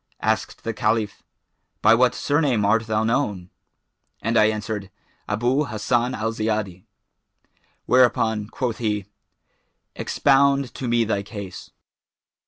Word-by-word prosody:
Asked - - -1
the 115 - -2
Caliph, 110 -1 -1 0.6
'By 110 - +7
what 125 +1 +3
surname 140 -8 +1
art 110 +2 +2
thou 110 0 +1
known?'[FN#420] 105 -6 -1 0.7
and 115 +2 0
I 110 - +6
answered, 105 -2 -2 0.4
'Abu 120 +8 +1
Hassan 120 +2 0
al 110 +1 -2
Ziyadi;' 110 -5 -3 1.0
whereupon 115 -4 +3
quoth 120 0 -3
he, 105 -4 -1 0.9
'Expound 140 -1 +2
to 130 - -5
me 120 0 +2
thy 105 -2 -1
case.' 100 -2 -8
110 Hz, 115 wpm, -23 LUFS, 105-125 Hz, 1.0 s, By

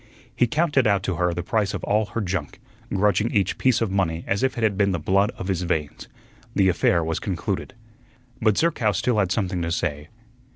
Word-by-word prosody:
He 120 - +3
counted 145 -2 +2
out 100 -2 +2
to 95 -4 -2
her 90 0 +1
the 85 0 -3
price 105 +1 0
of - - -6
all 105 +1 +1
her 115 +4 -3
junk, 90 -7 -3 0.3
grudging 105 +3 +2
each 100 -3 0
piece 130 -3 +2
of 110 -4 0
money 85 -4 0
as 100 +1 -1
if 130 -1 0
it 115 - -2
had 105 -3 +2
been 100 -1 +2
the 85 - -1
blood 100 +6 +2
of 95 - -5
his 95 -3 -1
veins. 80 -4 -3 0.5
The 95 -1 +4
affair 85 -1 +2
was 80 0 -2
concluded. 95 -4 -3 0.7
But 110 -3 +3
Zerkow 135 -11 +2
still 120 0 +1
had 95 -3 +1
something 95 -4 -1
to 85 0 -2
say. 75 -3 -2
95 Hz, 210 wpm, -24 LUFS, 90-110 Hz, 0.7 s, The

